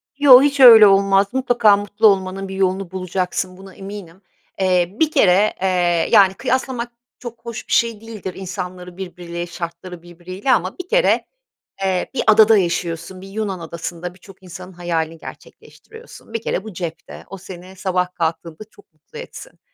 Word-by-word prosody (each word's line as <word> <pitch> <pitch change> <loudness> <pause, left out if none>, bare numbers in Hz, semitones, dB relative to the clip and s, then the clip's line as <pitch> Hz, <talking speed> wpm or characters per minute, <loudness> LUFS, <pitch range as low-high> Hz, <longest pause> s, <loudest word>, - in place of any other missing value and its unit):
Yo, 275 -3 +8
hiç 285 0 +1
öyle 225 -5 +10
olmaz. 195 0 +3
Mutlaka 240 -5 +3
mutlu 205 +2 +1
olmanın 195 -1 0
bir 190 - -7
yolunu 190 -1 -1
bulacaksın. 185 0 -3
Buna 190 0 -14
eminim. 195 -2 -10 0.4
Eee, 185 -1 +1
bir 315 -1 +2
kere, 210 - +3
eee, 175 -3 +1
yani, 195 -4 +6
kıyaslamak 245 +2 -3 0.3
çok 235 -1 -10
hoş 235 0 -7
bir - - -3
şey 230 -2 +1
değildir 215 -5 -8
insanları 180 -1 -7
birbiriyle, 175 -2 -7
şartları 170 +1 -8
birbiriyle 180 +7 -5
ama 185 -5 0
bir 365 - -8
kere, - - +2 0.6
eee, 190 -2 -1
bir 265 - -1
adada 220 0 +6
yaşıyorsun, 175 0 -3
bir 195 - -11
Yunan 195 -2 -4
adasında 170 +1 -7
birçok 190 +1 -18
insanın 180 +1 -10
hayalini 165 -2 -3
gerçekleştiriyorsun. 450 - -14
Bir 230 - -3
kere 190 - -3
bu 220 -1 -9
cepte, 170 -2 -8
o 195 - -8
seni 185 0 -12
sabah 180 -1 -2
kalktığında 165 +2 -4
çok 410 - -22
mutlu 465 - -14
etsin. - - -11
190 Hz, 160 wpm, -19 LUFS, 180-220 Hz, 0.6 s, öyle